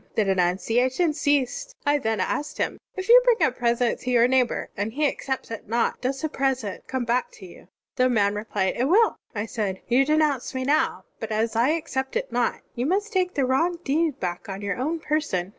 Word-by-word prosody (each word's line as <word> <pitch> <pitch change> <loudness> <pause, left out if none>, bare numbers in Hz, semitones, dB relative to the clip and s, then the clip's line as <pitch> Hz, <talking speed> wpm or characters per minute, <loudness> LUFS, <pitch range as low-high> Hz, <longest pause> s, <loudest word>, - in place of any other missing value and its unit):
The 215 - +3
denunciation 225 - +1
ceased. 295 - 0
I 290 0 +3
then 220 -5 -1
asked 295 +9 -2
him, - - -2 0.2
'If 375 0 -5
you 485 +2 +9
bring 485 -2 +4
a - - -1
present 240 0 0
to 255 - -5
your 240 -1 +5
neighbor 255 -2 +1
and 205 +3 -3
he 295 +2 +2
accepts 265 -3 -4
it 225 - -7
not, 235 +1 0
does 265 +1 -2
the - - +2
present 265 -8 -2
come 260 -2 -2
back 240 +2 0
to 190 - -12
you?' 175 - -14 0.3
The 255 0 +3
man 205 -4 +2
replied, 205 -2 -1
*It 250 - +1
will.' 420 +10 +4 0.2
I 205 +1 -2
said, 205 -4 -3
*You 255 +2 +4
denounce 300 -3 +1
me 260 - -1
now, 300 +4 +1
but - - -5
as 220 +1 0
I 235 +4 +3
accept 265 - -3
it - - -2
not, - - 0
you 245 +2 -2
must 410 +5 0
take 365 -1 0
the 275 - +2
wrong 330 +7 +1
deed 300 -1 0
back 180 +1 -4
on 195 +1 -6
your 200 0 -2
own 310 +7 -1
person. 285 - -1
260 Hz, 210 wpm, -24 LUFS, 225-305 Hz, 0.3 s, you